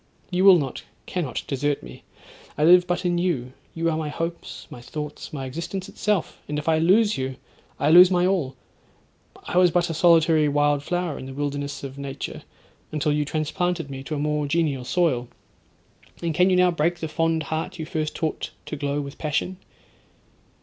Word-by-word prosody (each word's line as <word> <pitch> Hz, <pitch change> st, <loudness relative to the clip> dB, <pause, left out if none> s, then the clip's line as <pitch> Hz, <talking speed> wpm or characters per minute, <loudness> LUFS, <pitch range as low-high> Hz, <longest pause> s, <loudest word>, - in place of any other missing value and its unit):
"—you 180 Hz, +1 st, +1 dB
will 195 Hz, -2 st, +9 dB
not—cannot 140 Hz, +1 st, -4 dB
desert 145 Hz, +1 st, -1 dB
me. -, -, -11 dB, 0.6 s
I 150 Hz, -, +1 dB
live 180 Hz, +2 st, +7 dB
but 175 Hz, +1 st, -1 dB
in 175 Hz, -1 st, +1 dB
you; 135 Hz, -9 st, -1 dB, 0.2 s
you 165 Hz, 0 st, 0 dB
are 165 Hz, -, +1 dB
my 155 Hz, -2 st, -3 dB
hopes, 165 Hz, +3 st, -5 dB
my 120 Hz, -, -9 dB
thoughts, 150 Hz, +3 st, -7 dB
my 135 Hz, -3 st, -5 dB
existence 170 Hz, +8 st, -5 dB
itself: 205 Hz, -4 st, -2 dB
and 150 Hz, -, -2 dB
if 150 Hz, -, -5 dB
I 160 Hz, -1 st, +3 dB
lose 205 Hz, +3 st, +3 dB
you, 130 Hz, 0 st, -3 dB, 0.4 s
I 145 Hz, +2 st, +3 dB
lose 180 Hz, +2 st, +9 dB
my 180 Hz, -1 st, +2 dB
all—I 175 Hz, +1 st, -4 dB
was 180 Hz, -1 st, +6 dB
but 175 Hz, 0 st, +1 dB
a -, -, -2 dB
solitary 160 Hz, -2 st, +4 dB
wild 145 Hz, 0 st, +2 dB
flower 175 Hz, 0 st, -2 dB
in 130 Hz, -, -8 dB
the 135 Hz, -, -8 dB
wilderness 145 Hz, 0 st, -3 dB
of 135 Hz, 0 st, -7 dB
nature, 140 Hz, 0 st, -6 dB, 0.5 s
until 150 Hz, 0 st, 0 dB
you 150 Hz, 0 st, +1 dB
transplanted 160 Hz, +1 st, -2 dB
me 135 Hz, 0 st, -6 dB
to 155 Hz, -, -3 dB
a -, -, -3 dB
more 150 Hz, 0 st, 0 dB
genial 145 Hz, -5 st, 0 dB
soil; 140 Hz, -7 st, +1 dB, 1.0 s
and 165 Hz, -1 st, 0 dB
can 180 Hz, +4 st, +4 dB
you 185 Hz, -, +3 dB
now 180 Hz, 0 st, +4 dB
break 170 Hz, +1 st, 0 dB
the 160 Hz, -, -4 dB
fond 165 Hz, 0 st, 0 dB
heart 165 Hz, +4 st, -3 dB
you 160 Hz, -, -4 dB
first 155 Hz, 0 st, -3 dB
taught 160 Hz, -1 st, -2 dB, 0.2 s
to -, -, -5 dB
glow 145 Hz, 0 st, -2 dB
with 140 Hz, 0 st, -8 dB
passion?' 155 Hz, +4 st, -1 dB
155 Hz, 185 wpm, -24 LUFS, 145-175 Hz, 1.0 s, will